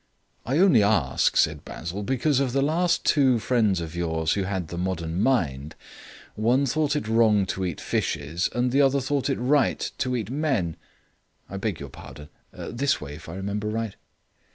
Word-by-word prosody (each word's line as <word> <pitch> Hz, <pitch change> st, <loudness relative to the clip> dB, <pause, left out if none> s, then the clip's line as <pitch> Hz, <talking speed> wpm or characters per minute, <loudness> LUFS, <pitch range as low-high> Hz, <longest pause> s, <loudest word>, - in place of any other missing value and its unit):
"I 135 Hz, +4 st, +1 dB
only 175 Hz, -, +5 dB
ask," 95 Hz, -, +2 dB
said 75 Hz, -1 st, +2 dB
Basil, 85 Hz, +5 st, -6 dB
"because 135 Hz, +5 st, +1 dB
of 130 Hz, -3 st, 0 dB
the 135 Hz, 0 st, +2 dB
last 170 Hz, +4 st, +1 dB
two 135 Hz, -5 st, +4 dB
friends 110 Hz, -5 st, +1 dB
of 85 Hz, 0 st, -6 dB
yours 80 Hz, -2 st, 0 dB
who 100 Hz, -2 st, -1 dB
had 95 Hz, -4 st, -3 dB
the 85 Hz, -, -6 dB
modern 90 Hz, -1 st, -2 dB
mind; 75 Hz, -, 0 dB, 0.6 s
one 120 Hz, +6 st, +2 dB
thought 150 Hz, +2 st, 0 dB
it 145 Hz, -7 st, -2 dB
wrong 110 Hz, -3 st, +3 dB
to 95 Hz, 0 st, -3 dB
eat 90 Hz, -4 st, -3 dB
fishes 80 Hz, +7 st, -1 dB
and 125 Hz, +1 st, +1 dB
the 140 Hz, +3 st, +3 dB
other 140 Hz, 0 st, +3 dB
thought 135 Hz, +1 st, -1 dB
it 135 Hz, -, 0 dB
right 135 Hz, +3 st, +2 dB, 0.2 s
to 125 Hz, -1 st, 0 dB
eat 115 Hz, -2 st, -3 dB
men. 130 Hz, -, 0 dB, 0.7 s
I 100 Hz, -, -6 dB
beg 95 Hz, -4 st, -3 dB
your 70 Hz, -, -7 dB
pardon 75 Hz, +2 st, -12 dB, 0.2 s
this 140 Hz, +3 st, -1 dB
way, 75 Hz, -1 st, -8 dB
if 80 Hz, +2 st, -11 dB
I 85 Hz, -, -7 dB
remember 100 Hz, +2 st, -3 dB
right." 110 Hz, -1 st, -3 dB
105 Hz, 180 wpm, -25 LUFS, 85-135 Hz, 0.7 s, only